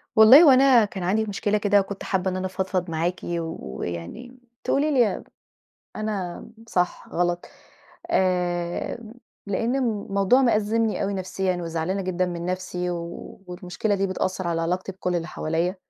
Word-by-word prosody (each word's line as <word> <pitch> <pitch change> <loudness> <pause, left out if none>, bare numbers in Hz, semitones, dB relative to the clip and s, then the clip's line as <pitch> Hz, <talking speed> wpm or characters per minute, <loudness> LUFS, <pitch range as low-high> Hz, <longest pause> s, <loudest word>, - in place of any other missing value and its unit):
والله 235 +9 +9
هوأنا 265 -5 +6
كان 195 -2 -6
عندي 210 +5 +1
مشكلة 205 0 0
كده 205 -1 +3
وكنت 195 0 -4
حابّة 190 -1 0
إن - - -4
أنا 185 - -3
أفضفض 185 -1 -2
معاكِ 165 +3 -1
ويعني 165 - -5 0.3
تقولي 295 +2 +1
لي 245 -6 +2 0.7
أنا 205 -5 -4 0.2
صح، 180 -4 -1
غلط، 175 0 -1 0.7
آآ، 180 - 0 0.5
لأن 230 +5 0
الموضوع 215 -2 +2
مأزّمني 225 -2 +1
أوي 200 +1 -1
نفسيًا 185 0 -2
وزعلانة 165 +4 -2
جدًا 185 -1 -1
من 175 -1 -5
نفسي 180 -1 -3
والمشكلة 180 +3 -4
دي 195 0 0
بتأثّر 185 -1 -2
على 165 -1 0
علاقتي 180 +3 -2
بكلّ 180 -1 -3
اللي 170 0 -2
حواليّا، 165 +4 -1
185 Hz, 135 wpm, -24 LUFS, 175-210 Hz, 0.7 s, والله